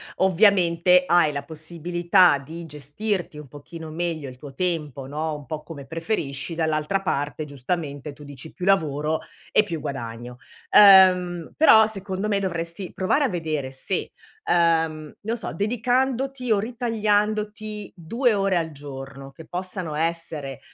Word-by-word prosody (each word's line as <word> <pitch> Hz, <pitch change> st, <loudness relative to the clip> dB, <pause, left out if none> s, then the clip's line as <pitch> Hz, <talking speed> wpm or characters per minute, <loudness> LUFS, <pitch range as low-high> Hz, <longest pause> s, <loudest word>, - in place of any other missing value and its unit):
ovviamente 180 Hz, -2 st, +4 dB
hai 175 Hz, -4 st, +4 dB
la 140 Hz, -1 st, -4 dB
possibilità 170 Hz, +2 st, +2 dB
di 165 Hz, +5 st, -9 dB
gestirti 160 Hz, +5 st, -3 dB
un 150 Hz, -1 st, -9 dB
pochino 155 Hz, +4 st, -10 dB
meglio 165 Hz, -3 st, -3 dB
il 125 Hz, -, -12 dB
tuo 140 Hz, +1 st, -11 dB
tempo 155 Hz, -6 st, -2 dB
no, 155 Hz, +2 st, -3 dB
un 145 Hz, -1 st, -10 dB
po' 155 Hz, +4 st, -5 dB
come 150 Hz, -3 st, -10 dB
preferisci, 165 Hz, -3 st, -3 dB
dall'altra 160 Hz, +3 st, 0 dB
parte 150 Hz, -2 st, -2 dB
giustamente, 145 Hz, +1 st, -4 dB
tu 150 Hz, -, -14 dB
dici 145 Hz, +1 st, -10 dB
più 180 Hz, -, -6 dB
lavoro 155 Hz, -5 st, +1 dB, 0.3 s
e -, -, +5 dB
più 170 Hz, -6 st, -5 dB
guadagno. 120 Hz, -3 st, -6 dB, 0.3 s
Uhm, 185 Hz, -4 st, +6 dB
però 220 Hz, -8 st, +7 dB
secondo 195 Hz, -1 st, -3 dB
me, 205 Hz, -2 st, +1 dB
dovresti 170 Hz, -1 st, -3 dB
provare 235 Hz, +10 st, +1 dB
a -, -, 0 dB
vedere 155 Hz, -6 st, -3 dB
se, 135 Hz, +8 st, -3 dB, 0.4 s
uhm, 160 Hz, -3 st, +1 dB
non 225 Hz, +3 st, -2 dB
so, 225 Hz, -, -5 dB
dedicandoti 250 Hz, +4 st, 0 dB
o 215 Hz, -, +5 dB
ritagliandoti 215 Hz, -2 st, -1 dB
2 230 Hz, +8 st, 0 dB
ore 195 Hz, -2 st, +1 dB
al 165 Hz, -1 st, -2 dB
giorno 135 Hz, -1 st, -9 dB
che 165 Hz, +3 st, -13 dB
possano 180 Hz, -2 st, -4 dB
essere, 160 Hz, -4 st, -3 dB
170 Hz, 140 wpm, -24 LUFS, 150-195 Hz, 0.4 s, però